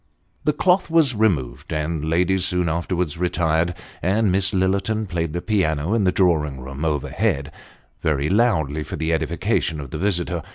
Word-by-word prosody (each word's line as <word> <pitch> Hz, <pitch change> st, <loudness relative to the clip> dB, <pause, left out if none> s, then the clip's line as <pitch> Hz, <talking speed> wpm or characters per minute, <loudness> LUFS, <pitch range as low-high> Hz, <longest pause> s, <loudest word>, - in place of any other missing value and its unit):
The 150 Hz, -, +3 dB
cloth 180 Hz, +3 st, +2 dB
was 160 Hz, -5 st, +4 dB
removed; 70 Hz, -, 0 dB
the 75 Hz, -2 st, -1 dB
ladies 85 Hz, +4 st, 0 dB
soon 90 Hz, -1 st, +1 dB
afterwards 85 Hz, 0 st, -2 dB
retired, 85 Hz, -1 st, +1 dB, 0.3 s
and 100 Hz, +2 st, +2 dB
Miss 95 Hz, +1 st, +1 dB
Lillerton 100 Hz, +3 st, 0 dB
played 85 Hz, -3 st, -2 dB
the 85 Hz, -, -3 dB
piano 85 Hz, -5 st, 0 dB
in 110 Hz, -4 st, +2 dB
the 90 Hz, -, +4 dB
drawing 80 Hz, -7 st, +1 dB
room 70 Hz, +3 st, -7 dB
overhead, 75 Hz, 0 st, -1 dB, 0.5 s
very 75 Hz, -2 st, +1 dB
loudly, 90 Hz, -, +2 dB
for -, -, -5 dB
the 80 Hz, +2 st, -1 dB
edification 80 Hz, 0 st, 0 dB
of 70 Hz, -3 st, -8 dB
the 75 Hz, -, -4 dB
visitor. 90 Hz, -3 st, 0 dB
85 Hz, 160 wpm, -22 LUFS, 75-95 Hz, 0.5 s, was